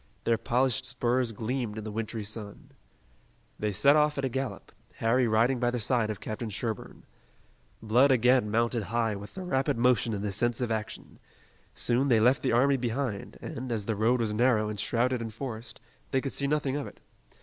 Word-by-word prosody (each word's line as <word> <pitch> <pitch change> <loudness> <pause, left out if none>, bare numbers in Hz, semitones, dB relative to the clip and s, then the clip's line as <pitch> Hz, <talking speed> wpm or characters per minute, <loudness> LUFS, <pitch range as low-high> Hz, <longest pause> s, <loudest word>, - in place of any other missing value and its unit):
Their 115 -1 +1
polished 125 +1 +1
spurs 125 0 0
gleamed 115 0 -3
in 110 - -5
the 110 - -5
wintry 110 0 -4
sun. 105 -1 -7 0.9
They 105 0 -1
set 140 +9 +5
off 150 -1 +3
at 140 - 0
a - - 0
gallop, 135 +2 -4 0.2
Harry 120 +2 +2
riding 115 +4 +2
by 120 0 +2
the 125 0 -2
side 115 0 +1
of 105 - -4
Captain 110 +1 -5
Sherburne. 110 +1 -5 0.8
Blood 120 +6 +4
again 125 -2 +4
mounted 115 +2 +1
high 115 0 0
with 100 +1 -9
the 190 - -5
rapid 135 -9 0
motion 120 -2 +2
and 100 - -4
the 100 - -1
sense 120 +4 0
of 120 -2 -1
action. 110 -1 -5 0.6
Soon 125 +3 +1
they 120 -4 +4
left 125 +5 +4
the 130 - 0
army 135 +4 +4
behind, 120 -3 -3
and, 125 +1 -5
as 110 -3 -2
the 110 - -1
road 115 +4 +2
was 110 -2 -1
narrow 110 -2 +2
and 105 -1 -4
shrouded 125 +3 +1
in 115 - -4
forest, 115 0 -7 0.3
they 135 - +1
could 135 0 -3
see 140 - +1
nothing 140 -2 0
of 145 - -4
it. - - -13
120 Hz, 195 wpm, -28 LUFS, 110-130 Hz, 0.9 s, set